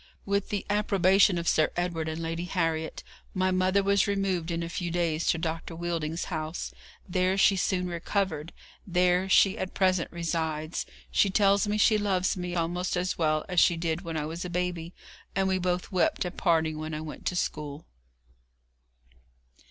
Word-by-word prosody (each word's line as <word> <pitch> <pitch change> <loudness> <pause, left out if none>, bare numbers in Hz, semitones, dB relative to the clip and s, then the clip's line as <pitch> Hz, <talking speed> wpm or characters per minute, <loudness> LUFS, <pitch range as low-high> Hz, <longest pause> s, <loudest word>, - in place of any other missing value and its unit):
With 200 0 0
the 205 -2 -2
approbation 200 -2 +3
of 170 0 -3
Sir 155 - +3
Edward 170 -3 -1
and 160 +1 -4
Lady 165 +1 -3
Harriet, 165 -3 -2 0.3
my 185 0 +2
mother 185 +2 +2
was 200 +1 +3
removed 195 -4 0
in 170 0 -2
a - - -3
few 175 0 -3
days 170 -2 0
to 165 - +3
Dr. 165 0 -4
Wheelding's 165 -1 -2
house. 155 +1 -4 0.3
There 185 +1 +1
she 195 0 +5
soon 185 -1 0
recovered! 175 -2 -2 0.4
there 180 +1 +2
she 195 +1 +5
at 185 - -4
present 185 -3 +2
resides. 160 -2 -2 0.2
She 200 - +3
tells 200 +1 +3
me 210 +1 0
she 215 0 +4
loves 190 -3 +1
me 180 -1 -4
almost 175 +2 -1
as 180 0 -1
well 155 -1 +1
as 180 -2 +2
she 170 0 +4
did 165 0 -1
when 165 -1 -4
I 150 - -2
was 165 +3 -5
a 180 - -5
baby, 175 -1 -3 0.4
and 195 0 +2
we 190 0 +1
both 180 +1 -1
wept 185 0 +1
at 180 - -5
parting 160 -3 +1
when 155 0 -4
I 155 - -4
went 155 -1 -7
to 180 - 0
school. 150 -3 -3
175 Hz, 175 wpm, -28 LUFS, 165-185 Hz, 0.4 s, she